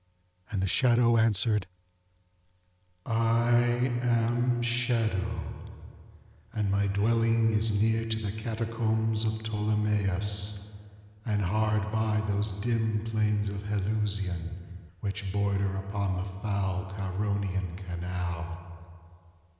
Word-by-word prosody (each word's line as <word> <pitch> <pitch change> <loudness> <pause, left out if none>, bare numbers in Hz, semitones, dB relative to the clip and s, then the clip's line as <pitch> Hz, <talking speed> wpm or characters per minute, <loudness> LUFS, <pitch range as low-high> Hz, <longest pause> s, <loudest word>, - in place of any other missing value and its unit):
And 100 -3 -1
the - - +1
shadow 120 +2 +4
answered, 105 -2 +3 1.4
ŌĆ£I 120 +2 +2
am 120 +1 +2
SHADOW, 115 -5 0 1.1
and 105 -2 0
my 100 0 +2
dwelling 115 +2 +3
is 110 -1 +2
near 115 +1 +2
to 110 - 0
the 105 -3 -3
Catacombs 110 0 -1
of 110 - +1
Ptolemais, 105 -1 0 0.6
and 105 -3 0
hard 105 +2 +1
by 110 -1 +1
those 105 +1 0
dim 110 +1 0
plains 105 -2 +1
of 100 0 -4
Helusion 100 -4 -2 0.4
which 100 -1 -3
border 100 -1 0
upon 100 0 -2
the 90 - -2 0.2
foul 95 -2 -1
Charonian 95 -2 -2
canal. 85 -2 -5
105 Hz, 100 wpm, -29 LUFS, 100-115 Hz, 1.4 s, shadow